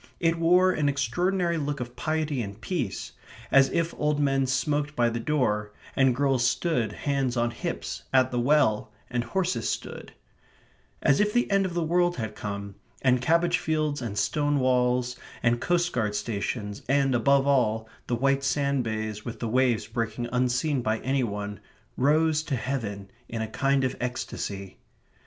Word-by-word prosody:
It 165 Hz, -1 st, +1 dB
wore 180 Hz, +3 st, +5 dB
an 150 Hz, -5 st, +1 dB
extraordinary 175 Hz, +4 st, 0 dB
look 145 Hz, 0 st, -2 dB
of 120 Hz, 0 st, -6 dB
piety 155 Hz, -1 st, -1 dB
and 100 Hz, -1 st, -6 dB
peace, 135 Hz, -, -3 dB, 0.4 s
as 135 Hz, -1 st, +6 dB
if 165 Hz, +4 st, 0 dB
old 150 Hz, 0 st, +1 dB
men 135 Hz, -2 st, +2 dB
smoked 145 Hz, +3 st, 0 dB
by 120 Hz, -1 st, +2 dB
the 115 Hz, -, -2 dB
door, 105 Hz, -6 st, 0 dB, 0.2 s
and 135 Hz, -3 st, +4 dB
girls 135 Hz, -2 st, +2 dB
stood, 125 Hz, -3 st, +1 dB
hands 135 Hz, 0 st, -1 dB
on 120 Hz, 0 st, +1 dB
hips, 60 Hz, -, -4 dB
at 130 Hz, -1 st, +4 dB
the 125 Hz, -, 0 dB
well, 120 Hz, -6 st, +2 dB, 0.2 s
and 120 Hz, -1 st, 0 dB
horses 180 Hz, -, -1 dB
stood; -, -, -5 dB, 0.9 s
as 140 Hz, -, +4 dB
if 210 Hz, 0 st, +3 dB
the 240 Hz, -3 st, +1 dB
end 195 Hz, -1 st, +3 dB
of 175 Hz, -, -7 dB
the 170 Hz, -, +1 dB
world 175 Hz, +2 st, +2 dB
had 110 Hz, -3 st, -4 dB
come, 100 Hz, -1 st, -5 dB, 0.3 s
and 125 Hz, -2 st, +3 dB
cabbage 170 Hz, +4 st, +2 dB
fields 155 Hz, -4 st, -1 dB
and 110 Hz, -4 st, -4 dB
stone 145 Hz, +2 st, +1 dB
walls, 125 Hz, -1 st, +1 dB, 0.3 s
and 120 Hz, 0 st, +2 dB
coast 175 Hz, 0 st, +1 dB
guard 110 Hz, -4 st, 0 dB
stations, 105 Hz, 0 st, -3 dB
and, 135 Hz, -1 st, +3 dB
above 135 Hz, +3 st, +3 dB
all, 110 Hz, -6 st, +2 dB, 0.2 s
the 120 Hz, -, 0 dB
white 135 Hz, +3 st, +1 dB
sand 140 Hz, -1 st, +1 dB
bays 110 Hz, -1 st, -3 dB
with 115 Hz, -2 st, -6 dB
the 115 Hz, -, -2 dB
waves 120 Hz, -2 st, +2 dB
breaking 115 Hz, +1 st, -3 dB
unseen 125 Hz, +3 st, +1 dB
by 110 Hz, -1 st, 0 dB
any 135 Hz, 0 st, +1 dB
one, 105 Hz, -2 st, -4 dB, 0.4 s
rose 155 Hz, +3 st, +3 dB
to 155 Hz, -3 st, -2 dB
heaven 110 Hz, -6 st, -4 dB, 0.2 s
in 115 Hz, -1 st, -3 dB
a -, -, -3 dB
kind 135 Hz, +4 st, +1 dB
of 130 Hz, -, 0 dB
ecstasy. 100 Hz, -6 st, -4 dB
130 Hz, 170 wpm, -27 LUFS, 115-150 Hz, 0.9 s, as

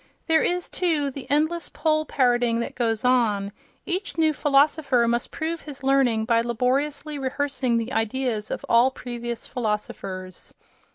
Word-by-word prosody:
There 320 Hz, -1 st, +3 dB
is, 355 Hz, 0 st, 0 dB
too, 310 Hz, -6 st, 0 dB
the 270 Hz, -1 st, -9 dB
endless 310 Hz, +3 st, +1 dB
poll 310 Hz, -1 st, 0 dB
parrotting 240 Hz, -3 st, +2 dB
that -, -, -4 dB
goes 225 Hz, -2 st, -1 dB
on: 215 Hz, -6 st, +2 dB, 0.3 s
each 370 Hz, 0 st, -3 dB
new 315 Hz, -1 st, +3 dB
philosopher 280 Hz, -3 st, +3 dB
must 235 Hz, +1 st, 0 dB
prove 330 Hz, +1 st, -4 dB
his 285 Hz, -3 st, -10 dB
learning 260 Hz, -5 st, +3 dB
by 230 Hz, 0 st, +3 dB
laboriously 275 Hz, +5 st, -1 dB
rehearsing 265 Hz, -2 st, -1 dB
the 230 Hz, +3 st, -3 dB
ideas 225 Hz, -1 st, -1 dB
of -, -, -4 dB
all 235 Hz, +3 st, +5 dB
previous 240 Hz, -2 st, -6 dB
philosophers.... 200 Hz, -5 st, -4 dB
255 Hz, 140 wpm, -24 LUFS, 235-295 Hz, 0.3 s, all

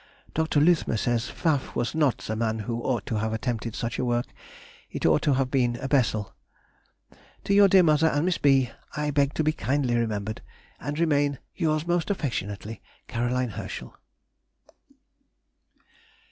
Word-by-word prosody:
Dr. 160 Hz, -1 st, +1 dB
Luthmer 155 Hz, -6 st, +3 dB
says, 120 Hz, +2 st, 0 dB
Pfaff 155 Hz, -5 st, -1 dB
was 120 Hz, -, -1 dB
not 150 Hz, -6 st, +2 dB
the 110 Hz, -, -4 dB
man 110 Hz, 0 st, 0 dB
who 115 Hz, +2 st, -3 dB
ought 120 Hz, -4 st, -1 dB
to 110 Hz, -, -2 dB
have 110 Hz, +1 st, -1 dB
attempted 115 Hz, 0 st, -3 dB
such 115 Hz, 0 st, -3 dB
a -, -, 0 dB
work, 120 Hz, 0 st, 0 dB, 0.6 s
it -, -, -4 dB
ought 80 Hz, -1 st, +4 dB
to 145 Hz, -, +2 dB
have 130 Hz, -1 st, 0 dB
been 125 Hz, -3 st, +2 dB
a 130 Hz, -, -4 dB
Bessel. 115 Hz, -7 st, +1 dB, 1.1 s
To 200 Hz, -, 0 dB
your 200 Hz, 0 st, +7 dB
dear 190 Hz, -1 st, +6 dB
mother 155 Hz, 0 st, +4 dB
and 145 Hz, 0 st, +1 dB
Miss 180 Hz, -1 st, 0 dB
B. 135 Hz, -4 st, +3 dB, 0.3 s
I 150 Hz, 0 st, 0 dB
beg 140 Hz, 0 st, +1 dB
to 155 Hz, -, +1 dB
be 155 Hz, 0 st, +2 dB
kindly 135 Hz, -4 st, 0 dB
remembered, 110 Hz, -2 st, -2 dB, 0.4 s
And 145 Hz, +3 st, -4 dB
remain 145 Hz, -4 st, +2 dB, 0.2 s
Yours, 155 Hz, -3 st, 0 dB
most 175 Hz, 0 st, 0 dB
affectionately, 110 Hz, -, -3 dB, 0.3 s
C. -, -, -14 dB
HERSCHEL. 120 Hz, -2 st, -2 dB
130 Hz, 160 wpm, -26 LUFS, 115-150 Hz, 1.1 s, your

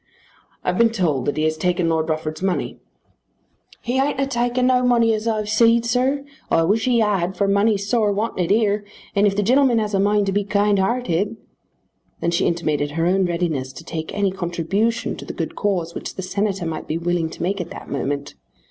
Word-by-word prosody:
"I've -, -, -1 dB
been 235 Hz, -1 st, +6 dB
told 175 Hz, -, 0 dB
that 145 Hz, -, -1 dB
he 155 Hz, -, +1 dB
has 155 Hz, 0 st, +1 dB
taken 180 Hz, +1 st, 0 dB
Lord 160 Hz, 0 st, 0 dB
Rufford's 155 Hz, 0 st, -3 dB
money." 190 Hz, -1 st, -2 dB, 1.0 s
"He 250 Hz, +2 st, 0 dB
ain't 275 Hz, 0 st, 0 dB
'a 275 Hz, -, +2 dB
taken 245 Hz, -1 st, 0 dB
no 255 Hz, 0 st, +4 dB
money 235 Hz, -2 st, +3 dB
as 215 Hz, +1 st, -2 dB
I've 215 Hz, -2 st, 0 dB
seed, 230 Hz, +2 st, +4 dB
sir. 260 Hz, +4 st, +1 dB, 0.2 s
I 165 Hz, -, +3 dB
wish 210 Hz, +6 st, +1 dB
he 245 Hz, -2 st, +3 dB
had, 190 Hz, -4 st, 0 dB
for 200 Hz, -, +2 dB
money's 200 Hz, 0 st, +2 dB
sore 215 Hz, -2 st, +2 dB
wanted 200 Hz, -4 st, -1 dB
here, 205 Hz, -1 st, +2 dB, 0.3 s
and 200 Hz, +1 st, +4 dB
if 195 Hz, -, 0 dB
the 205 Hz, -, +1 dB
gen'leman 255 Hz, +2 st, +4 dB
has 215 Hz, -1 st, -1 dB
a 195 Hz, -, +2 dB
mind 205 Hz, +1 st, +2 dB
to 195 Hz, -, 0 dB
be 205 Hz, +1 st, +1 dB
kind 205 Hz, 0 st, +2 dB
hearted 210 Hz, -1 st, 0 dB, 0.4 s
" -, -, -45 dB
Then 170 Hz, -, 0 dB
she 170 Hz, -, +1 dB
intimated 155 Hz, -4 st, 0 dB
her 165 Hz, +1 st, 0 dB
own 185 Hz, +1 st, +2 dB
readiness 165 Hz, -7 st, -2 dB
to 165 Hz, -, -10 dB
take 160 Hz, -1 st, -5 dB
any 200 Hz, -1 st, +1 dB
contribution 190 Hz, +5 st, -1 dB
to -, -, -8 dB
the -, -, -6 dB
good -, -, -4 dB
cause 180 Hz, -5 st, -1 dB
which -, -, -6 dB
the 190 Hz, -, -5 dB
Senator 195 Hz, -1 st, -1 dB
might 165 Hz, -1 st, -4 dB
be 155 Hz, -, -1 dB
willing 170 Hz, -1 st, -1 dB
to -, -, -7 dB
make 195 Hz, +2 st, -1 dB
at 170 Hz, -, -6 dB
that -, -, -9 dB
moment. 140 Hz, +1 st, -3 dB
200 Hz, 210 wpm, -21 LUFS, 170-225 Hz, 1.0 s, been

